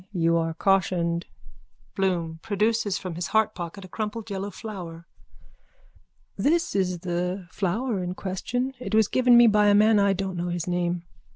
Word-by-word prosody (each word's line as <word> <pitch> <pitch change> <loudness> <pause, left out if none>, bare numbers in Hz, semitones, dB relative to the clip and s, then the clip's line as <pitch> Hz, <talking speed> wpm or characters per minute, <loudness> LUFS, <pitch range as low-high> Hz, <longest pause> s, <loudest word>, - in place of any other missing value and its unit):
You 165 -1 +2
are 165 -1 -1
cautioned. 175 -2 +1 0.7
BLOOM: 170 -4 -1
(Produces 210 -1 0
from 185 -3 -6
his 170 +1 -3
heartpocket 200 -4 -1
a - - -11
crumpled 215 +2 -5
yellow 195 +1 -3
flower.) 175 -6 -8 1.3
This 335 - +1
is 180 -3 0
the 180 +1 -3
flower 205 +3 -1
in 180 0 -4
question. 245 +8 -3
It 245 -3 -3
was 220 -2 +4
given 250 0 +5
me 240 - +8
by 210 -2 +4
a 205 - +5
man 215 +1 +5
I 200 -1 +3
don't 190 -1 -3
know 175 +1 -2
his 175 -1 -3
name. 175 -1 -1
190 Hz, 160 wpm, -25 LUFS, 175-215 Hz, 1.3 s, me